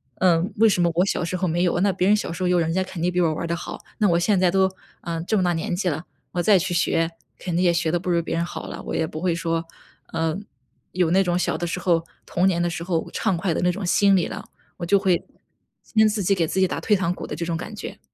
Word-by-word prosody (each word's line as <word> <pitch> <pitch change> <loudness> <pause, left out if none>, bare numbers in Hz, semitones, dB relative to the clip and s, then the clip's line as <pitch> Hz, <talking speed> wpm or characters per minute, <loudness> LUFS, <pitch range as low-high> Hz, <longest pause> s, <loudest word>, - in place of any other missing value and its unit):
嗯， 180 +2 +2
为 225 +2 +6
什 185 -4 +2
么 170 -1 +3
我 180 +2 +3
小 185 - -1
时 180 +2 -2
候 185 0 0
没 170 +2 0
有。 175 -1 +1
那 200 -1 +3
别 185 - +1
人 210 - +6
小 210 - -3
时 180 - -6
候 - - +2
有 180 -1 +3
人 165 0 0
家 190 +1 +1
肯 185 -2 -7
定 180 +1 +1
比 180 0 +1
我 160 -2 +2
玩 155 - -4
儿 - - -2
得 170 - -1
好， - - -7 0.2
那 210 - +4
我 170 - +3
现 185 +2 +2
在 185 -1 +4
都， 190 +1 +2 0.3
呃， 165 -1 -3
这 215 +4 0
么 185 - +2
大 175 -1 +2
年 165 +1 -2
纪 180 0 0
了， 155 +3 -4 0.3
我 175 - -1
再 205 +1 +5
去 180 0 -1
学 165 0 +1 0.3
肯 175 -3 -4
定 180 - +2
也 175 - +5
学 165 -2 0
得 175 - +1
不 180 - -5
如 170 -1 +2
别 165 - -3
人 170 - 0
好 - - -7
了。 - - -7
我 - - -4
也 160 - +1
不 155 +1 -7
会 175 -2 +1
说， 165 -1 -1 0.5
呃， 165 0 0 0.6
有 175 -2 +1
那 195 +1 +4
种 175 -1 0
小 - - 0
的 175 - -3
时 180 - -3
候 170 -2 +2 0.2
童 180 +2 +1
年 175 -2 +1
的 175 - +1
时 170 0 -4
候 170 -2 -1
畅 185 - 0
快 175 -1 0
的 - - -1
那 180 0 +3
种 190 +1 -5
心 200 +2 +4
理 175 - +2
了， - - -6 0.3
我 170 - -4
就 200 +3 +4
会， 190 -3 +1 0.7
跟 220 0 +6
自 210 -2 -1
己 195 - +3
给 170 -4 +1
自 190 - -1
己 190 - +4
打 - - -3
退 210 - +2
堂 185 -2 0
鼓 - - -7
的 - - -5
这 170 - -3
种 165 -1 -2
感 215 +6 -6
觉。 - - -7
175 Hz, 325 characters per minute, -23 LUFS, 170-190 Hz, 0.7 s, 为